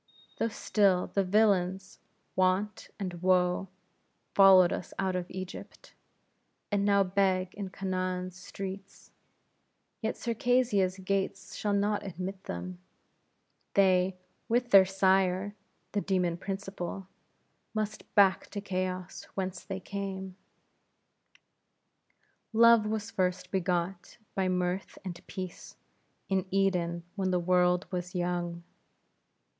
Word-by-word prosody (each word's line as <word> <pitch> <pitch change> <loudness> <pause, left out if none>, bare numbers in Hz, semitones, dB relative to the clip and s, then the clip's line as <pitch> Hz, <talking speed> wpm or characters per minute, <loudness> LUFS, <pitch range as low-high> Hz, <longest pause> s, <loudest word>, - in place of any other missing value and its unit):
Though - - +2
still 200 -4 +2
the 195 - +2
villains, 190 -2 +2 0.4
Want 185 +3 +1
and 180 -3 -4
Woe, 180 0 +2 0.7
followed 190 -3 +7
us - - -6
out 190 -1 0
of 180 -1 -3
Egypt, 185 0 -8 0.8
and 205 -1 +2
now 200 -1 +4
beg 185 -1 +1
in 200 -2 -5
Canaan's 185 -1 -3
streets: 195 +1 -8 0.9
yet 220 - -2
Circassia's 230 -5 +1
gates 195 0 -2
shall 205 -1 -1
not 205 +1 +1
admit 190 +1 -6
them; 90 +1 -5 1.0
they, 185 -1 +4 0.3
with 240 +1 +1
their 195 -1 +9
sire, 190 +1 +2 0.4
the 205 - 0
demon 180 -4 +1
Principle, 195 0 -5 0.7
must 215 0 -4
back 195 -2 +5
to 205 - -5
chaos, 185 -2 -3
whence 185 -2 -3
they 195 -1 -5
came. 190 -1 -5 2.2
Love 230 -1 +6
was 215 0 -3
first 180 -1 -1
begot 180 -1 -2 0.2
by 190 -1 0
Mirth 180 +1 -1
and 175 -2 -6
Peace, 185 -2 -7 0.5
in 190 -1 0
Eden, 180 -3 +1
when 190 -2 0
the 180 -1 +2
world 180 +1 +3
was 180 0 -4
young. 175 -1 -2
190 Hz, 110 wpm, -30 LUFS, 180-200 Hz, 2.2 s, their